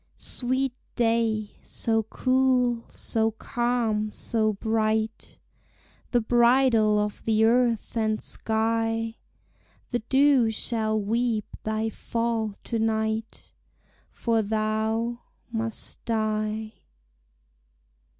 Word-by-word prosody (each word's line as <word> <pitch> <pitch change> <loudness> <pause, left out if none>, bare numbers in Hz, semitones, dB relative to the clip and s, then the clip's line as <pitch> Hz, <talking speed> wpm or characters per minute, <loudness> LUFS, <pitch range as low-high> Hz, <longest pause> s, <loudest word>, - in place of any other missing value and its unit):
Sweet 260 +1 -1 0.2
day, 225 -3 +1
so 225 -1 0
cool, 250 +1 +1
so 225 0 0
calm, 225 -2 -1
so 215 0 0
bright, 220 +1 -1 0.7
The 245 - +3
bridall 235 -2 +4
of 210 0 -1
the 220 0 +3
earth 235 -1 +2
and 220 -1 +1
skie; 225 +1 -1 0.7
The 240 - +1
dew 265 0 +4
shall 220 -1 0
weep 225 +1 0 0.2
thy 220 +1 -1
fall 230 -2 -2
to 230 - -2
night; 220 0 -2 0.6
For 230 -2 0
thou 220 +2 -1 0.3
must 225 -1 -4
die. 215 -1 -1
225 Hz, 90 wpm, -26 LUFS, 220-235 Hz, 0.7 s, bridall